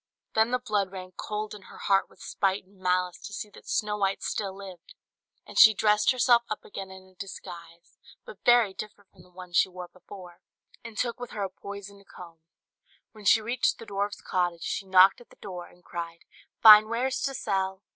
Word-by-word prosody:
Then 220 +1 +3
the 250 - +1
blood 210 -6 -1
ran 185 -1 -8
cold 210 0 -4
in 210 - -10
her - - -14
heart 195 -1 +1
with - - -16
spite 195 0 -1
and 195 0 -25
malice 180 -1 0
to - - -9
see 210 +1 -6
that - - -16
Snow 210 0 0
White 195 -1 -1
still 200 -2 -2
lived; 190 -3 -12 0.5
and - - -3
she 220 -2 +9
dressed 210 0 +3
herself 245 -2 +4
up 215 - -5
again 195 -1 -8
in 190 0 -12
a - - -24
disguise, 170 -2 -11 0.3
but 485 - -13
very 240 -5 +5
different 205 -1 -10
from 185 - -19
the 180 - -20
one 180 0 -12
she 180 - +4
wore 180 -1 -9
before, 180 -1 -13 0.4
and 225 -2 -10
took 235 0 -2
with 245 -1 -6
her 205 - -4
a 190 - -4
poisoned 200 0 -10
comb, 170 -2 -13 0.7
When 215 -2 -15
she 220 +2 +5
reached 240 +3 0
the 230 - -10
dwarf's 200 0 -3
cottage, 175 -2 -1
she 195 - -3
knocked 190 +3 +6
at 240 - -18
the - - -19
door, 180 -3 -8
and 180 - -22
cried, 170 -1 -7 0.4
"Fine 215 -1 +10
wares 250 +3 -1
to 275 -1 -2
sell!" 190 -3 -2
200 Hz, 205 wpm, -27 LUFS, 185-215 Hz, 0.7 s, Fine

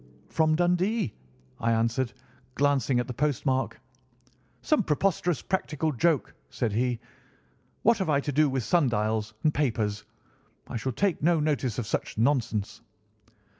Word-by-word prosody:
"'From 155 -1 +2
Dundee,' 180 - +1 0.5
I 115 0 +2
answered, 115 +2 +1 0.4
glancing 140 -3 +2
at 125 - 0
the 125 - -5
postmark. 135 -1 0 0.8
"'Some 305 - +3
preposterous 175 0 0
practical 160 -4 -1
joke,' 150 +3 +1 0.2
said 130 -4 -1
he. 120 +2 0 0.8
'What 230 0 +4
have 190 -4 -1
I 140 -2 +3
to 145 - -3
do 150 +1 +3
with 130 -2 -1
sundials 110 -8 +1
and 155 - +3
papers? 110 -7 0 0.6
I - - -7
shall 130 +4 -2
take 190 - 0
no 165 +1 +3
notice 145 -6 0
of 120 - -2
such - - -3
nonsense. 115 -5 0
135 Hz, 135 wpm, -27 LUFS, 115-160 Hz, 0.8 s, What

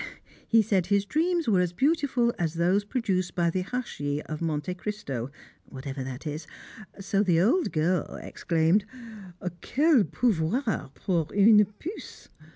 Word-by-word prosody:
He 225 -1 +5
said 190 -5 +1
his 200 0 +2
dreams 335 - 0
were 200 -5 +4
as 180 -1 0
beautiful 265 - +1
as 165 -2 -1
those 180 +4 +2
produced 205 -5 -1
by 170 -1 +2
the 185 - -1
Hachis 165 - -3
of 155 0 -6
Monte 160 +1 -2
Cristo 180 - -5 0.4
(whatever 135 0 -6
that 130 +3 -7
is), 155 +1 -5 0.5
so 195 0 0
the 175 -5 +3
old 270 - +2
girl 170 +3 0
exclaimed, 165 +5 +1 0.8
"Quel 285 - +3
pouvoir 220 - 0
pour 170 -6 -1
une 210 +1 +7
puce!" 365 +7 -8
185 Hz, 140 wpm, -27 LUFS, 160-230 Hz, 0.8 s, une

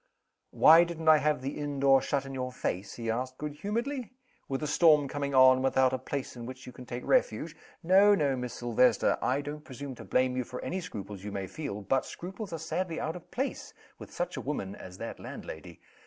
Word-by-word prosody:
"Why 165 +2 +7
didn't 165 -2 -1
I 155 - +8
have 150 -3 0
the 135 - -4
inn 145 -1 -3
door 135 -1 +5
shut 140 -1 -1
in 135 - -7
your 130 -1 -3
face" 95 -5 -4
he 115 -1 -2
asked, 130 +2 -3
good 150 -1 -4
humoredly 235 - -3 0.4
"with 135 +2 -2
a - - -1
storm 150 -2 +5
coming 140 0 -3
on, 130 0 +8
and 130 - -2
without 130 -1 +3
a 130 - -1
place 135 +1 -5
in 120 -1 -7
which 130 0 -9
you 125 - -8
can 125 - -11
take 120 +1 -6
refuge? - - +1 0.3
No, 195 +4 +6
no, 145 -6 +1
Miss 125 -1 -5
Silvester! 120 -1 +2
I 135 +3 +1
don't 150 +1 -7
presume 135 0 -7
to - - -10
blame 130 0 +1
you 130 - 0
for 125 +1 -7
any 185 +1 -3
scruples 100 - -7
you 105 - -5
may 100 -1 -3
feel 105 - -6
but 135 +6 0
scruples 190 +3 -7
are 165 - -3
sadly 165 +2 -3
out 160 - -3
of 175 - -11
place 270 +3 -4 0.2
with - - -10
such - - -3
a - - -3
woman - - -4
as - - -11
that - - -6
landlady. - - -9
140 Hz, 225 wpm, -29 LUFS, 125-160 Hz, 0.4 s, I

